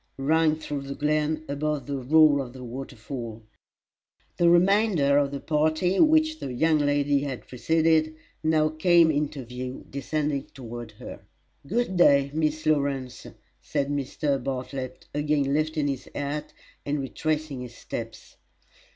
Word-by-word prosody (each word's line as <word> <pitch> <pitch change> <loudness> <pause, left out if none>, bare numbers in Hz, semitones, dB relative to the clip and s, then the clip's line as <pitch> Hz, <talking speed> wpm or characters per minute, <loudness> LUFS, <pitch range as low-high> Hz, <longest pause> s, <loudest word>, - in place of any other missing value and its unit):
rang 155 +3 +3
through 150 -2 -5
the 140 0 -6
glen, 155 +1 0
above 145 -1 -2
the 140 0 -3
roar 150 +2 +5
of 125 -3 -5
the 130 -1 -9
waterfall. 120 -2 -7 0.9
The 170 -1 +4
remainder 175 -5 +4
of 140 -1 +1
the 140 0 -5
party 155 +5 +1
which 315 0 +4
the 130 - -5
young 155 +5 +2
lady 145 -1 +2
had 135 -3 -5
preceded 155 +4 +2 0.3
now 155 -1 +3
came 165 +1 +4
into 145 -3 -2
view 125 +2 -7
descending 145 +1 -2
toward 120 -3 -8
her. - - -10 0.5
"Good 215 -1 -1
day, 140 -5 +5
Miss 155 0 -1
Lawrence!" 140 -4 -1 0.3
said 140 0 -2
Mr. 140 -1 -1
Bartlett, 130 -1 -5
again 145 -2 +1
lifting 155 0 0
his 135 -2 -4
hat, 145 +1 -3 0.3
and 145 +1 -1
retracing 150 0 -2
his 120 -1 -9
steps. 115 -1 -8
145 Hz, 135 wpm, -26 LUFS, 135-155 Hz, 0.9 s, roar